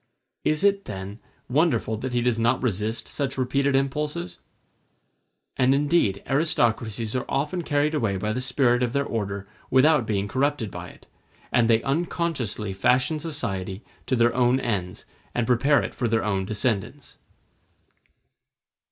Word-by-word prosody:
Is 155 +4 +1
it, 200 0 +3
then, 100 +2 -7 0.3
wonderful 130 -5 +1
that 130 +4 -4
he 120 0 +1
does 120 -2 +1
not 120 +3 +2
resist 110 0 -1
such 140 -2 -3
repeated 135 +2 +1
impulses? 135 - -2 1.2
And 130 +1 +4
indeed 140 - +1
aristocracies 115 -6 0
are 125 - 0
often 150 +6 -1
carried 150 -1 +1
away 110 -10 0
by 105 +3 -2
the 125 - -2
spirit 125 -1 +2
of 125 -1 0
their 140 0 +1
order 100 -4 -3 0.2
without 135 -2 +4
being 100 -2 0
corrupted 130 -3 0
by - - -7
it; - - -17 0.5
and 120 -1 +3
they 115 0 +4
unconsciously 135 - -1
fashion 130 +10 +2
society 105 - -4 0.2
to 130 - +2
their 120 -1 +3
own 125 +1 +3
ends, 95 -8 -3 0.3
and 120 - +1
prepare 135 +5 +3
it - - -5
for 120 - -1
their 110 0 +1
own 95 -3 0
descendants. 110 +5 -2
125 Hz, 145 wpm, -25 LUFS, 110-140 Hz, 1.2 s, And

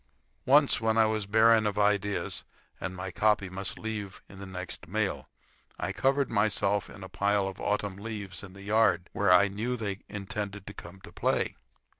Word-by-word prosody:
Once, 140 -2 +5
when 110 0 +1
I 110 - +6
was 110 -2 -1
barren 110 +1 +5
of 105 - -2
ideas, 105 -1 +1 0.4
and 95 0 -4
my 95 0 -5
copy 105 -1 +2
must 95 +1 -2
leave 105 -3 -5
in 95 - -13
the 100 - -7
next 90 -3 -6
mail, 105 +2 -2 0.5
I - - -2
covered 135 0 +1
myself 105 -1 +1
in 100 - -11
a - - -6
pile 100 +1 +1
of 95 0 -7
autumn 105 -2 -1
leaves 100 -4 -6
in 95 -2 -10
the 100 0 -11
yard, 100 -4 +2
where 100 -3 +2
I 90 +3 +7
knew 110 +5 -3
they 100 -3 -3
intended 105 0 -5
to 105 - -8
come 95 0 -11
to - - -12
play. - - 0
100 Hz, 185 wpm, -29 LUFS, 95-110 Hz, 0.5 s, I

